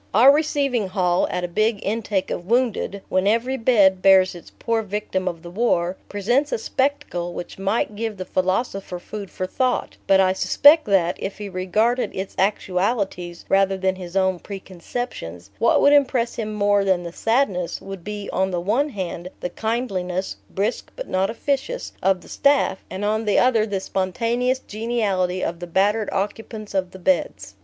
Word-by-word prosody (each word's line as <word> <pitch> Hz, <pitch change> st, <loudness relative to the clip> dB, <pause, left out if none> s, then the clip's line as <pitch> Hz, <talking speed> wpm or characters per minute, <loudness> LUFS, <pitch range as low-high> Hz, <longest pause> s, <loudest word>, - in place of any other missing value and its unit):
Our 250 Hz, +6 st, +8 dB
receiving 280 Hz, -7 st, +1 dB
hall, 180 Hz, -2 st, +1 dB
at 180 Hz, 0 st, -2 dB
a -, -, 0 dB
big 215 Hz, +5 st, +1 dB
intake 205 Hz, -2 st, -1 dB
of 175 Hz, -, -4 dB
wounded, 230 Hz, -4 st, 0 dB
when 185 Hz, +1 st, +1 dB
every 235 Hz, +5 st, +1 dB
bed 205 Hz, -7 st, +4 dB
bears 190 Hz, -1 st, +6 dB
its 175 Hz, -, -12 dB
poor 230 Hz, -1 st, 0 dB
victim 200 Hz, -2 st, -3 dB
of 170 Hz, -2 st, -4 dB
the 175 Hz, -, -9 dB
war, 180 Hz, -4 st, +1 dB
presents 240 Hz, +9 st, +1 dB
a -, -, +1 dB
spectacle 220 Hz, -9 st, -2 dB
which 175 Hz, -, -7 dB
might 205 Hz, +2 st, 0 dB
give 220 Hz, -1 st, -3 dB
the 185 Hz, -, -5 dB
philosopher 185 Hz, +1 st, -1 dB
food 200 Hz, +2 st, -8 dB
for 185 Hz, -, -4 dB
thought; 255 Hz, +7 st, -1 dB
but 195 Hz, -1 st, +5 dB
I 185 Hz, -1 st, +4 dB
suspect 295 Hz, -, +5 dB
that, 185 Hz, -3 st, +2 dB
if 195 Hz, -, -5 dB
he 205 Hz, -1 st, -6 dB
regarded 210 Hz, +7 st, 0 dB
its 190 Hz, +1 st, -4 dB
actualities 190 Hz, -2 st, -1 dB
rather 195 Hz, 0 st, +3 dB
than 190 Hz, 0 st, 0 dB
his 180 Hz, -1 st, -9 dB
own 190 Hz, -2 st, +2 dB
preconceptions, 180 Hz, -, -7 dB
what 230 Hz, -, +4 dB
would 285 Hz, -, +6 dB
impress 255 Hz, -4 st, +3 dB
him 215 Hz, -2 st, -4 dB
more 205 Hz, -1 st, +3 dB
than 190 Hz, -2 st, +1 dB
the 170 Hz, -1 st, -7 dB
sadness 225 Hz, -7 st, 0 dB
would 195 Hz, -3 st, -8 dB
be 205 Hz, 0 st, -5 dB
on 190 Hz, 0 st, +1 dB
the 180 Hz, -2 st, -1 dB
one 230 Hz, +12 st, +1 dB
hand 180 Hz, -6 st, -5 dB
the 180 Hz, -, -3 dB
kindliness, 190 Hz, -4 st, -2 dB
brisk 205 Hz, +5 st, -2 dB
but -, -, -6 dB
not 190 Hz, +1 st, 0 dB
officious, 280 Hz, -, -2 dB
of 190 Hz, -1 st, +2 dB
the -, -, -15 dB
staff, 280 Hz, -9 st, +2 dB
and 195 Hz, +2 st, -4 dB
on 215 Hz, +2 st, 0 dB
the 205 Hz, -, +2 dB
other 230 Hz, -4 st, +3 dB
the 200 Hz, -2 st, -2 dB
spontaneous 235 Hz, +7 st, 0 dB
geniality 205 Hz, -6 st, -1 dB
of 170 Hz, 0 st, -3 dB
the 175 Hz, -, -6 dB
battered 205 Hz, +5 st, +1 dB
occupants 215 Hz, +1 st, -4 dB
of 190 Hz, -2 st, 0 dB
the 190 Hz, -, -11 dB
beds. 275 Hz, +10 st, -1 dB
200 Hz, 175 wpm, -22 LUFS, 185-230 Hz, -, Our